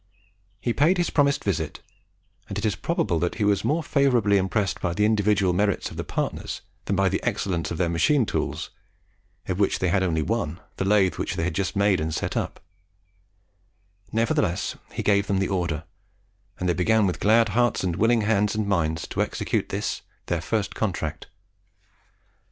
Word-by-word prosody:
He 120 +3 -1
paid 160 +9 +3
his 175 - 0
promised 140 -2 +2
visit, 80 -6 -2 0.7
and - - -4
it 105 - -2
is 105 - +2
probable 100 - 0
that 85 +1 -1
he - - -1
was 100 -1 +2
more 160 +3 +1
favourably 125 -9 +3
impressed 95 -2 0
by 85 -1 -1
the 105 - +3
individual 105 -3 +2
merits 100 +2 0
of - - -9
the - - -2
partners - - -3 0.2
than 100 - 0
by 95 0 +3
the 95 +1 0
excellence 95 -7 -1
of 85 - -4
their 90 - +1
machine 100 - +3
tools - - -3 0.8
of 95 0 -2
which 100 - +2
they 90 - 0
had 95 +2 +2
only 80 -4 +1
one, 85 -5 -2 0.2
the 95 - -1
lathe 100 -2 +3
which - - -2
they 80 - -1
had 90 - -1
just 100 -2 -2
made 100 -1 +3
and 80 0 -2
set - - -2
up; - - -2 1.5
nevertheless 105 -4 0 0.2
he - - -4
gave 100 -1 +3
them 100 - +1
the 95 - 0
order, 85 -5 -1 0.8
and 90 - -1
they 90 - +3
began 110 +5 +3
with 90 - -1
glad 115 +2 +4
hearts 120 +1 +1
and 90 -3 0
willing 115 +1 +3
hands 105 -1 +1
and 110 -1 0
minds 80 -5 0
to - - -2
execute - - -1
this - - -2 0.2
their 85 -2 -1
first 105 +3 -1
contract. 90 -8 -3
100 Hz, 185 wpm, -25 LUFS, 90-110 Hz, 1.5 s, glad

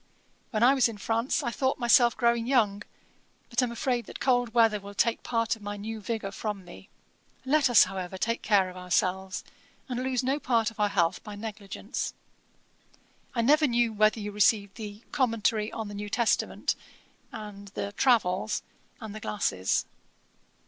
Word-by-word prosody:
'When 220 -2 0
I 255 +3 +7
was 260 -3 +3
in 220 - -7
France, 230 +7 0
I 240 - -1
thought 265 +2 0
myself 240 0 +4
growing 235 -1 +2
young, 215 -6 +2 0.7
but 240 +2 +2
am 250 -2 0
afraid 240 -2 -1
that - - -8
cold 245 -3 +2
weather 225 -3 +4
will 200 0 -11
take 230 +2 +1
part 230 -1 0
of 220 - -18
my 205 0 -5
new 220 +2 -5
vigour 215 -2 -3
from 200 -2 -5
me. 95 - -13 0.6
Let 285 0 +3
us, 240 - +8
however, 190 -1 -5
take 230 +4 -1
care 200 -3 +3
of 180 - -9
ourselves, 185 +1 -1 0.4
and 250 -2 -3
lose 255 -1 0
no 270 +3 0
part 230 -4 +1
of 220 - -19
our 210 0 +3
health 175 -2 +1
by 210 -1 -8
negligence. 205 -2 -5 1.2
'I 235 - +2
never 300 +5 +4
knew 235 -2 +1
whether 215 +1 +3
you 210 0 -4
received 205 -1 +2
the 210 0 -8
Commentary 230 -5 +1
on 225 -2 -5
the 205 - -8
New 205 0 -5
Testament 235 +2 +1 0.6
and 205 -1 -8
the 200 - -3
Travels, 210 -4 +2 0.4
and 220 -4 -7
the 215 - -7
glasses. 145 - 0
220 Hz, 170 wpm, -28 LUFS, 205-240 Hz, 1.2 s, us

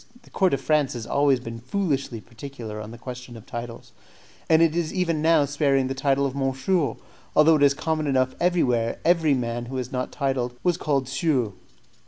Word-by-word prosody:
The - - -20
court 190 -2 +2
of - - -5
France 150 -2 +1
has 120 -3 -6
always 140 -1 +2
been 115 -1 -7
foolishly 135 - -2
particular 115 -2 -8
on 105 - -8
the 120 - -10
question 125 0 -8
of 115 - -13
titles, 120 -1 -7 0.6
and 160 +1 +6
is 165 0 +1
even 170 -5 0
now 160 -2 +4
sparing 140 -1 +1
of 130 - -3
the - - -1
title 140 +1 +1
of 135 -1 -3
monsieur, 135 +1 0 0.4
although 155 +1 +6
it - - -3
is 140 -1 +5
common 155 0 -1
enough 130 -2 +1
everywhere 125 -10 +1
every 165 -4 +4
man 120 -1 -3
who 130 - -6
was 125 -1 -4
not 125 -1 -3
titled 130 -4 -1
was 175 -2 +2
called 140 -6 0
Sieur. 135 -5 0
135 Hz, 195 wpm, -24 LUFS, 125-155 Hz, 0.6 s, and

